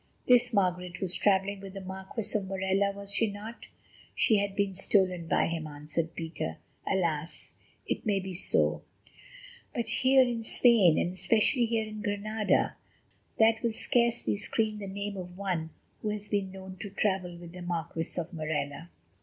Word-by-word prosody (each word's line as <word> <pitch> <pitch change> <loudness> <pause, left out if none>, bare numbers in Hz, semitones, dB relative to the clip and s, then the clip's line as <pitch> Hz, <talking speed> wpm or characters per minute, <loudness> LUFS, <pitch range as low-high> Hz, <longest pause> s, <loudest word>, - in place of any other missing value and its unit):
"This 245 0 +6
Margaret 180 -3 0
was 185 -2 -2
travelling 200 0 +2
with 195 0 -9
the - - -4
Marquis 190 +4 -4
of 200 -3 0
Morella, 190 +1 +1
was 200 0 -6
she 225 +1 +2
not?" 215 +3 -9 0.5
"She 220 - +4
had 200 -1 -1
been 200 -1 +1
stolen 185 -3 +2
by 160 - +3
him," 165 -1 -3
answered 155 +3 -4
Peter. 160 - -4 0.3
"Alas! 165 -4 -1 0.3
it - - -2
may 205 -3 +1
be 190 0 -5
so; 180 - +1 0.9
but 235 -3 -1
here 260 0 +5
in 240 -2 -1
Spain, 220 -7 +5
and 175 - 0
especially 225 +5 +3
here 225 -1 0
in 215 0 -7
Granada, 210 0 0 0.6
that 220 0 +4
will 230 -1 0
scarcely 235 -1 +2
screen 215 +1 0
the 200 - -5
name 200 +1 -4
of 180 -1 -7
one 180 -5 -2 0.3
who 215 - -1
has 210 0 -4
been 200 -2 -1
known 190 0 -9
to 205 - -6
travel 190 -3 -1
with 170 -1 -10
the 180 +1 -9
Marquis 170 -2 -3
of 175 +2 -5
Morella." 155 0 -3
195 Hz, 165 wpm, -29 LUFS, 175-215 Hz, 0.9 s, This